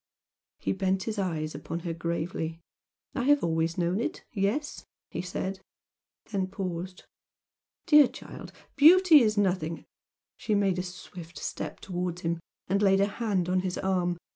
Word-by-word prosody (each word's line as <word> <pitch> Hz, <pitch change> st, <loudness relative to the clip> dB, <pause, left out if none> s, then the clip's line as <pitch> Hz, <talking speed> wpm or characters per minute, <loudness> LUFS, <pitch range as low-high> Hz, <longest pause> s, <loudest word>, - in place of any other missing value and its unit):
He -, -, -2 dB
bent 190 Hz, 0 st, 0 dB
his 215 Hz, -1 st, -3 dB
eyes 160 Hz, -5 st, -2 dB
upon 155 Hz, +4 st, -5 dB
her 170 Hz, -1 st, -3 dB
gravely. 165 Hz, 0 st, -3 dB, 0.5 s
"I 255 Hz, -, -1 dB
have 290 Hz, 0 st, +4 dB
always 165 Hz, 0 st, 0 dB
known 175 Hz, +3 st, +1 dB
it 235 Hz, -, -3 dB
yes!" 220 Hz, +9 st, -1 dB, 0.3 s
he -, -, -3 dB
said, 190 Hz, +1 st, -4 dB, 0.7 s
then 195 Hz, -3 st, 0 dB
paused 185 Hz, -1 st, -5 dB, 0.8 s
"Dear 300 Hz, -5 st, +7 dB
child, -, -, -10 dB, 0.2 s
beauty 325 Hz, +1 st, +8 dB
is 215 Hz, -2 st, +2 dB
nothing 180 Hz, -5 st, 0 dB, 0.3 s
" -, -, -65 dB
She 215 Hz, -, 0 dB
made 195 Hz, -3 st, +2 dB
a -, -, +1 dB
swift 180 Hz, -2 st, -9 dB
step -, -, -5 dB
towards 180 Hz, -1 st, -3 dB
him 170 Hz, -1 st, -1 dB, 0.3 s
and 200 Hz, +2 st, +1 dB
laid 195 Hz, -1 st, +4 dB
a 200 Hz, -, +5 dB
hand 200 Hz, -4 st, -1 dB
on 185 Hz, 0 st, +2 dB
his 185 Hz, -1 st, -2 dB
arm. 180 Hz, -2 st, 0 dB
185 Hz, 155 wpm, -28 LUFS, 170-205 Hz, 0.8 s, beauty